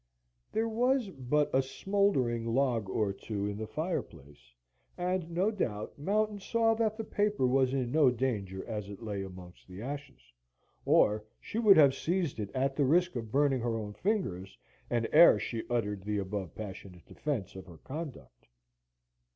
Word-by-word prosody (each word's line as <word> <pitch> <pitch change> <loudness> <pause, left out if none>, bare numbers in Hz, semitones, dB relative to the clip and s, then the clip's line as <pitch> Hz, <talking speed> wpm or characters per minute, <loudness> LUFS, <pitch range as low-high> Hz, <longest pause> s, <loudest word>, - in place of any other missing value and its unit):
There 225 +1 0
was 240 -1 +1
but 145 +1 0
a 130 - +5
smouldering 135 - 0
log 120 -7 +1
or 100 0 0
two 100 0 -4
in 100 0 -2
the 110 +1 -5
fireplace, 75 - -5 0.5
and 180 -1 -1
no 180 +5 +1
doubt 110 - -3
Mountain 210 +5 0
saw 225 +3 +2
that 220 -1 0
the 225 - -3
paper 205 -8 0
was 130 0 +3
in 130 -3 -1
no 150 -2 +5
danger 110 -7 -2
as 105 -3 -4
it 100 +3 -9
lay 105 -3 -3
amongst 90 -2 -10
the 90 +1 -10
ashes, 135 - -8 0.5
or 105 0 +4 0.2
she 220 - -4
would 210 -5 +7
have 140 -3 +7
seized 165 -2 -1
it 105 -2 -3
at 135 +1 0
the 145 - +2
risk 170 +4 +3
of 115 -3 -5
burning 135 -1 +2
her 115 -1 -1
own 105 -2 -5
fingers, 100 - -2 0.3
and 120 -1 0
ere 160 -7 +8
she 110 +2 -3
uttered 105 -5 -1
the 105 +1 -1
above 95 -2 -4
passionate 95 -4 -9
defence 130 - -4
of 95 0 -9
her 85 -3 -12
conduct. 135 - -8
130 Hz, 165 wpm, -31 LUFS, 105-170 Hz, 0.5 s, ere